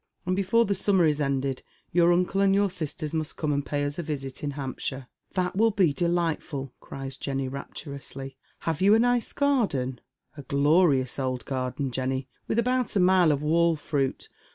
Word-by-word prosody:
And 185 Hz, +1 st, +1 dB
before 200 Hz, +5 st, +3 dB
the 200 Hz, -, +1 dB
summer 190 Hz, -2 st, +3 dB
is 150 Hz, -1 st, +1 dB
ended 135 Hz, -1 st, -1 dB, 0.3 s
your 170 Hz, 0 st, +4 dB
nnola 180 Hz, +3 st, +2 dB
and 195 Hz, 0 st, +4 dB
your 200 Hz, -1 st, +2 dB
sisters 155 Hz, -3 st, -4 dB
must 155 Hz, -2 st, -3 dB
come 150 Hz, -2 st, 0 dB
and 140 Hz, 0 st, 0 dB
pay 145 Hz, 0 st, -2 dB
us 145 Hz, +3 st, -4 dB
a -, -, +1 dB
visit 140 Hz, -3 st, -5 dB
in 145 Hz, -, -1 dB
Hampshire." 135 Hz, -1 st, -4 dB, 0.2 s
" -, -, -39 dB
That 180 Hz, -1 st, 0 dB
will 225 Hz, +3 st, +4 dB
be 190 Hz, -8 st, +2 dB
delightful 170 Hz, -3 st, -1 dB
1 135 Hz, -2 st, -8 dB
" -, -, -49 dB
cries 135 Hz, -1 st, -7 dB
Jenny, 135 Hz, -1 st, -2 dB
rapturously; 135 Hz, 0 st, -7 dB
" -, -, -38 dB
HavA 165 Hz, -1 st, -1 dB
you 205 Hz, +2 st, +7 dB
a -, -, +4 dB
nice 245 Hz, 0 st, +2 dB
garden? 195 Hz, -, 0 dB, 0.2 s
" -, -, -36 dB
"A -, -, -6 dB
glorious 140 Hz, -1 st, +2 dB
old 130 Hz, -2 st, -2 dB
garden, 130 Hz, 0 st, -2 dB
Jenny, 130 Hz, +1 st, -2 dB, 0.2 s
with -, -, -1 dB
about 250 Hz, -1 st, +1 dB
a -, -, +4 dB
mile 180 Hz, -3 st, +5 dB
of 145 Hz, 0 st, -1 dB
wall 165 Hz, +1 st, +3 dB
fri^it. 140 Hz, -3 st, -2 dB
150 Hz, 200 wpm, -27 LUFS, 135-185 Hz, 0.3 s, you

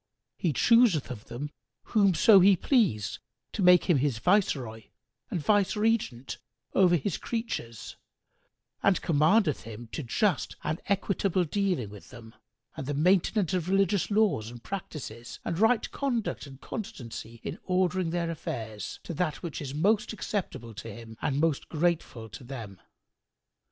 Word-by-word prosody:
He 170 Hz, -, 0 dB
chooseth 220 Hz, -, +4 dB
of 110 Hz, -4 st, -8 dB
them 145 Hz, +5 st, -6 dB, 0.4 s
whomso 200 Hz, -1 st, +6 dB
He 195 Hz, +1 st, +6 dB
please 175 Hz, -, +1 dB, 0.3 s
to -, -, -2 dB
make 180 Hz, -1 st, +7 dB
him 175 Hz, -6 st, +3 dB
His 135 Hz, -3 st, 0 dB
viceroy 125 Hz, -, +1 dB, 0.4 s
and 175 Hz, -, -2 dB
viceregent 205 Hz, -, +1 dB, 0.3 s
over 180 Hz, -2 st, +5 dB
His 170 Hz, +3 st, -2 dB
creatures 225 Hz, -, -5 dB, 0.8 s
and 195 Hz, -3 st, +3 dB
commandeth 160 Hz, +2 st, +3 dB
him 115 Hz, +1 st, -9 dB
to -, -, -4 dB
just 170 Hz, -, 0 dB
and 155 Hz, +2 st, -2 dB
equitable 195 Hz, -2 st, +1 dB
dealing 175 Hz, -, -1 dB
with 105 Hz, -2 st, -12 dB
them 115 Hz, -3 st, -12 dB, 0.4 s
and 135 Hz, -, -6 dB
the 145 Hz, -, -1 dB
maintenance 180 Hz, +3 st, +2 dB
of 180 Hz, -1 st, -1 dB
religious 195 Hz, 0 st, +2 dB
laws 205 Hz, -, +2 dB
and 120 Hz, 0 st, -11 dB
practices 135 Hz, -, -7 dB
and 170 Hz, 0 st, -2 dB
right 225 Hz, +1 st, +3 dB
conduct 240 Hz, -, -2 dB
and 135 Hz, -1 st, -12 dB
constancy 115 Hz, -, -7 dB
in -, -, -5 dB
ordering 185 Hz, -1 st, +1 dB
their 170 Hz, 0 st, -1 dB
affairs 110 Hz, -9 st, -5 dB
to -, -, -5 dB
that 160 Hz, 0 st, -2 dB
which 170 Hz, -3 st, -5 dB
is 140 Hz, -1 st, -5 dB
most 210 Hz, +8 st, +2 dB
acceptable 180 Hz, -, -4 dB
to 115 Hz, +2 st, -8 dB
Him 115 Hz, +1 st, -10 dB
and 135 Hz, 0 st, 0 dB
most 160 Hz, -2 st, 0 dB
grateful 160 Hz, -8 st, -1 dB
to 110 Hz, -, -10 dB
them. 115 Hz, -7 st, -8 dB
165 Hz, 145 wpm, -28 LUFS, 120-195 Hz, 0.8 s, make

